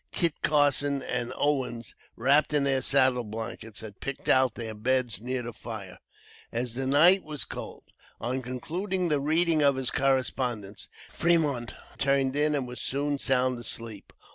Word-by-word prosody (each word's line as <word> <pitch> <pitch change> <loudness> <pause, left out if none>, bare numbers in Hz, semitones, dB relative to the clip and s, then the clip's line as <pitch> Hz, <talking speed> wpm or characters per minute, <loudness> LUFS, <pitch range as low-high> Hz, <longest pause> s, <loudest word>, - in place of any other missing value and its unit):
Kit 170 -3 +1
Carson 145 -2 +2
and 125 -1 -2
Owens, 125 -6 -1 0.2
wrapped 140 +5 +3
in 145 - +4
their 135 -1 +1
saddle 130 -2 +3
blankets, 110 -1 -7
had 105 -2 -10
picked 135 -1 -6
out 130 -3 +4
their 115 -2 -5
beds 120 -1 -1
near 125 +1 -3
the 120 0 -6
fire, 105 -6 -8 0.5
as 120 0 -2
the 130 +2 -2
night 170 +8 +5
was 155 -2 -5
cold. - - -8 0.4
On 130 +2 -2
concluding 175 - -2
the 150 -2 +2
reading 160 +2 +4
of 140 -1 +4
his 130 -2 -2
correspondence, 125 -6 -1 0.2
Fremont 150 -8 +1 0.2
turned 135 -1 +2
in 150 +1 +3
and 135 -3 -2
was 125 0 -7
soon 140 +1 -1
sound 130 -2 +1
asleep. 115 -3 -5
130 Hz, 155 wpm, -27 LUFS, 120-145 Hz, 0.5 s, night